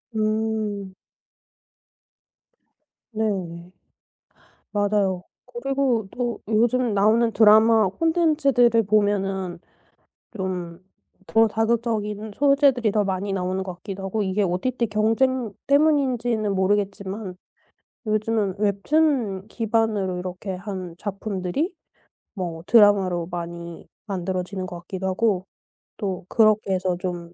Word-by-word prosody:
음. 215 -2 -1 2.2
네 220 0 -1
네. 175 -3 -4 1.0
맞아요. 205 -3 +1 0.2
그리고 250 -3 -1
또 240 -1 -3
요즘 235 +2 +2
나오는 220 +3 +3
드라마 220 0 +6
콘텐츠들을 280 - +3
보면은 195 -3 0 0.8
좀 180 -3 -4 0.4
더 225 0 +4
자극적인 220 -1 -1
소재들이 275 -4 +3
더 210 - +2
많이 195 0 -2
나오는 185 0 -1
것 185 -2 -6
같기도 195 +1 -7
하고 210 +3 -1
이게 200 +1 0
OTT 230 +7 -1
경쟁 225 +2 +1
때문인지는 255 -8 +2
모르겠지만 195 0 -1 0.7
요즘은 215 -2 0
웹툰 210 0 +1
기반으로 220 -5 0
이렇게 185 +2 -5
한 185 -3 -6
작품들이 200 - -3 0.6
뭐 175 -5 -5
드라마로 195 -6 +4
많이 170 -1 -7 0.2
만들어지는 185 -1 -3
것 175 -1 -7
같기도 190 +1 -4
하고 190 -1 0 0.5
또 190 -4 -4
그렇게 215 -3 +3
해서 185 -1 0
좀 175 -1 -5
205 Hz, 235 characters per minute, -23 LUFS, 185-225 Hz, 2.2 s, 드라마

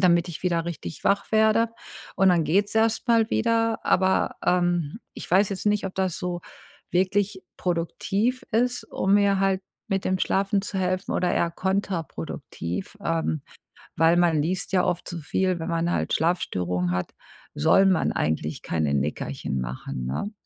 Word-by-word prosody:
damit 175 -1 +4
ich 170 +2 -8
wieder 170 -2 +1
richtig 140 - -6
wach 200 +2 +1
werde. 220 +1 +4 0.5
Und 195 0 +5
dann 170 -3 +3
geht's 200 +7 +1
erstmal 225 0 +3
wieder, 230 -1 +1
aber, 190 0 +2
ähm, 175 0 +1
ich - - -8
weiß 190 +2 +4
jetzt 195 +1 -4
nicht, 210 -1 +2
ob 190 - -7
das 185 -3 0
so 180 -2 -3 0.5
wirklich 190 +2 +1
produktiv 195 +7 -1
ist, 245 +2 +1
um 195 +1 0
mir 200 -1 +3
halt 195 -1 +2 0.3
mit 195 -1 -1
dem 185 0 +1
Schlafen 195 +1 +1
zu 195 -1 -4
helfen 185 0 -1
oder 180 - +1
eher 170 - +1
kontraproduktiv, 190 - -3
ähm, 160 -3 -1 0.5
weil 165 +2 +4
man 170 -3 +3
liest 180 +6 -2
ja 185 - +4
oft 180 -1 -1
so 175 - -5
viel. 185 +4 0
Wenn 160 - -4
man 165 0 0
halt - - -1
Schlafstörungen 90 - 0
hat, 90 0 -2 0.4
soll 195 - +5
man 185 -3 +2
eigentlich 75 0 -2
keine 80 -3 -1
Nickerchen 70 -1 -2
machen, 65 +1 -5
ne? 65 - -3
180 Hz, 160 wpm, -25 LUFS, 165-195 Hz, 0.5 s, Und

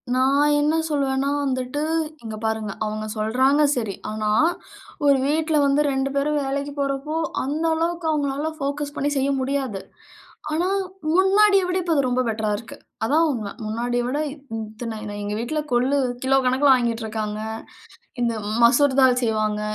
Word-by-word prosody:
நான் 280 +3 +3
என்ன 300 +2 +2
சொல்வேன்னா 275 -2 0
வந்துட்டு 260 +1 -2 0.4
இங்க 220 -1 -5
பாருங்க 220 -2 -1
அவுங்க 215 0 -3
சொல்றாங்க 260 +7 +2
சரி, 220 -6 -2 0.2
ஆனா 215 0 -2 0.8
ஒரு 280 -1 +5
வீட்ல 310 +2 +1
வந்து 280 +1 +3
2 270 0 0
பேரும் 295 +1 +1
வேலைக்கு 280 +1 -2
போறப்போ, 275 +2 -2 0.3
அந்த 295 +5 -2
அளவுக்கு 335 +1 -1
அவுங்களால 290 0 -1
போகஸ் 285 +1 -3
பண்ணி 285 0 0
செய்ய 270 +1 +1
முடியாது. 260 -7 -2 0.7
ஆனா 335 +4 +1 0.5
முன்னாடிய 395 +2 +5
விட 360 +1 0
இப்ப 340 -2 0
அது 280 - +3
ரொம்ப 250 0 +1
பெட்டரா 220 -1 -1
இருக்கு. 225 - -10 0.3
அதான் 310 +8 +3
உண்மை. 215 -6 -4
முன்னாடிய 240 +3 -1
விட 275 +4 -1
இத் 280 -1 -12 0.2
இத்தன 220 +1 -6 0.2
எங்க 205 0 -3
வீட்ல 275 +7 -2
கொல்லு 255 +4 +2 0.3
கிலோ 270 +1 +3
கணக்கில 260 +3 +3
வாங்கிட்டு 235 -2 0
இருக்காங்க. 215 -1 -3 0.8
இந்த 235 -1 +1 0.3
மசூர்தால் 260 +1 +5
செய்வாங்க. 215 -2 0
270 Hz, 145 wpm, -23 LUFS, 230-290 Hz, 0.8 s, ஒரு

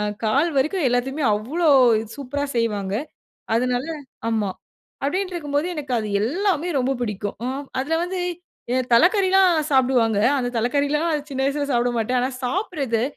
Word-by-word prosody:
அ - - 0 0.2
கால் 280 +10 +2
வரைக்கும் 305 +4 +1
எல்லாத்தியுமே 265 +4 -1
அவ்வளவு 250 -2 +3
சூப்பரா 285 +1 -3
செய்வாங்க. 205 -4 -1 0.6
அதனால 250 +2 +1 0.5
ஆமா, 215 -3 0 0.5
அப்படின்ட்டு 370 +5 -1
இருக்கும்போது 295 -1 -1
எனக்கு 285 -4 -5
அது 215 - -3
எல்லாமே 345 - 0
ரொம்ப 260 +1 +1
பிடிக்கும். 205 -2 -3
அ - - -1 0.3
அதில 325 +4 0
வந்து 360 +1 -3 0.7
தலைக்கறில்லாம் 380 - +5 0.2
சாப்பிடுவாங்க. 250 -5 +3 0.2
அந்த 245 -1 -1
தலைக்கறிலா 285 +6 +1 0.3
சின்ன 265 - -3
வயசுல 285 +1 -1
சாப்பிட 240 0 +2
மாட்டேன். 250 +3 0
ஆனா 255 +2 0
சாப்பிடறது, 275 - -1
270 Hz, 130 wpm, -22 LUFS, 235-315 Hz, 0.7 s, தலைக்கறில்லாம்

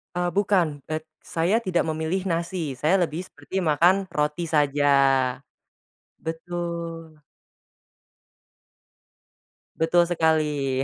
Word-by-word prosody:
Eee, 180 0 0
bukan, 180 -8 +1
et 155 0 -3 0.2
saya 170 +5 0
tidak 175 -4 0
memilih 160 +5 -2
nasi 170 -4 -2
saya 160 +9 +2
lebih 160 +4 -5
seperti 190 0 -5
makan 165 +3 +4 0.2
roti 150 +3 -1
saja. 145 -3 +1 1.4
Betul. 165 -1 -5 2.6
Betul 170 +2 +4
sekali. 150 -5 +1
165 Hz, 90 wpm, -24 LUFS, 155-175 Hz, 2.6 s, makan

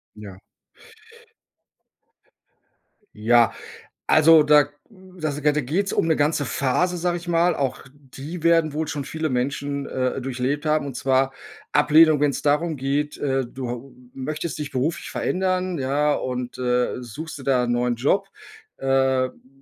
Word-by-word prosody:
Ja. 100 -3 -10 2.8
Ja. 115 +1 +3 0.5
Also 155 0 +6
da 150 -1 +5 0.2
da 185 -5 -7
s 145 +1 -5
da 150 - +3
geht's 155 +8 -1
um - - +1
'ne 160 - +3
ganze 145 0 +1
Phase, 170 +8 0
sage 175 0 0
ich 175 +1 -8
mal. 170 0 +2
Auch 135 -3 -2
die 145 +4 -9
werden 165 -3 +3
wohl 160 +1 -1
schon 145 -2 -4
viele 160 0 -3
Menschen, 140 +2 -2
äh, 130 +1 -2
durchlebt 135 +4 -2
haben, 155 -1 +1
und 135 - -6
zwar 135 +1 +1 0.4
Ablehnung 155 0 +5
wenn's 145 -3 0
darum 150 +2 +1
geht, 140 +3 -2
äh, 135 -3 -1
du 125 0 -7
hau 125 +3 -7 0.2
möchtest 150 +4 -5
dich 150 -1 -5
beruflich 135 +5 -2
verändern, 185 -1 -1
ja, 145 +2 +1
und, 125 -1 -4
äh, 125 0 0
suchst 150 +7 -8
dir 135 - -10
da 130 -2 +2
'n 120 - -1
neuen 120 0 0
Job, 195 +11 +1 0.5
äh, 135 -1 +1
b - - -23
b 130 - -25
145 Hz, 155 wpm, -23 LUFS, 130-160 Hz, 2.8 s, Also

